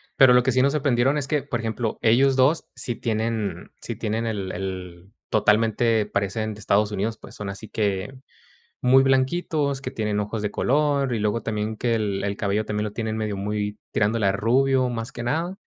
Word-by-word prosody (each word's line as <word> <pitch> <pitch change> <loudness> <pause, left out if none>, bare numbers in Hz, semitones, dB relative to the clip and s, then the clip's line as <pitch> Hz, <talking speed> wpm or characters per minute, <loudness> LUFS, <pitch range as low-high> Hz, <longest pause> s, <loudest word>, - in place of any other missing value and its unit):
Pero 130 -3 +7
lo 125 - +6
que 130 - +2
sí 130 - +3
nos 140 +1 +3
sorprendieron 135 -1 +2
es 140 -2 -2
que, 150 -2 0
por 120 -4 -3
ejemplo, 110 0 -2
ellos 130 +4 +4
2 140 +6 +3
sí 120 -1 -3
tienen 110 -2 -2
sí - - -5
tienen 110 +2 -2
el 100 -4 -3
el 90 0 -6 0.2
totalmente, 110 +1 +2
parecen 105 +2 -2
de 105 - -12
Estados 105 +1 +2
Unidos. 110 +3 -2
Pues, - - -13
son 105 -1 -5
así 100 +2 -8
que 100 +3 -2 0.7
muy 130 +1 +6
blanquitos, 140 +1 +1
que 130 - -5
tienen 105 -4 -1
ojos 105 +1 -3
de 105 - -1
color 140 -1 +1
y - - -1
luego 105 +2 0
también 110 0 -2
que 115 0 0
el 105 -3 -1
el 100 0 -2
cabello 105 +1 0
también 105 0 -2
lo 105 - -4
tienen 110 -1 -3
medio 105 -2 -2
muy 105 +1 -3
tirándole 105 0 +1
a 95 - +3
rubio, 130 +4 +2
más 115 +1 -4
que 120 - -6
nada. 165 +9 -1
110 Hz, 200 wpm, -24 LUFS, 105-130 Hz, 0.7 s, Pero